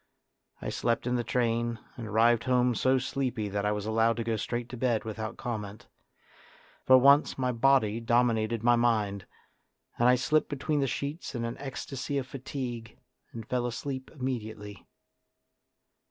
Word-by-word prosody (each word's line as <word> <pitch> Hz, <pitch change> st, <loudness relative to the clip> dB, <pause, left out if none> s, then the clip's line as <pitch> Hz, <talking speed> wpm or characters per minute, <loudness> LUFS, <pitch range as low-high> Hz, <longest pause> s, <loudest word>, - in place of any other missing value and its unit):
I -, -, -2 dB
slept 115 Hz, 0 st, -1 dB
in 125 Hz, -, 0 dB
the 120 Hz, -, 0 dB
train, 115 Hz, 0 st, 0 dB, 0.2 s
and 120 Hz, -3 st, -7 dB
arrived 115 Hz, +2 st, +3 dB
home 125 Hz, -1 st, +3 dB
so 130 Hz, +3 st, +2 dB
sleepy 125 Hz, -4 st, -2 dB
that 100 Hz, +1 st, -1 dB
I -, -, +2 dB
was 105 Hz, -1 st, -3 dB
allowed 115 Hz, +1 st, +2 dB
to 115 Hz, -, -1 dB
go 115 Hz, 0 st, -1 dB
straight 120 Hz, +2 st, -3 dB
to 125 Hz, -, -6 dB
bed 120 Hz, -2 st, 0 dB
without 110 Hz, +1 st, -5 dB
comment. 105 Hz, -3 st, -5 dB, 1.0 s
For 130 Hz, -, +8 dB
once 140 Hz, +3 st, +5 dB
my 125 Hz, -1 st, 0 dB
body 115 Hz, -3 st, +3 dB
dominated 115 Hz, -1 st, +1 dB
my 120 Hz, 0 st, +5 dB
mind, 105 Hz, -5 st, 0 dB, 0.7 s
and 120 Hz, +1 st, +5 dB
I 125 Hz, -, +6 dB
slipped 150 Hz, +5 st, +1 dB
between 145 Hz, +1 st, -1 dB
the 135 Hz, -, +1 dB
sheets 140 Hz, +3 st, -4 dB
in 115 Hz, -1 st, -2 dB
an 115 Hz, -, -4 dB
ecstasy 135 Hz, 0 st, -4 dB
of 135 Hz, -, -1 dB
fatigue 125 Hz, -4 st, -6 dB, 0.3 s
and 115 Hz, -2 st, -8 dB
fell 125 Hz, -1 st, 0 dB
asleep 130 Hz, +2 st, -5 dB
immediately. 110 Hz, -, -5 dB
120 Hz, 160 wpm, -29 LUFS, 110-130 Hz, 1.0 s, For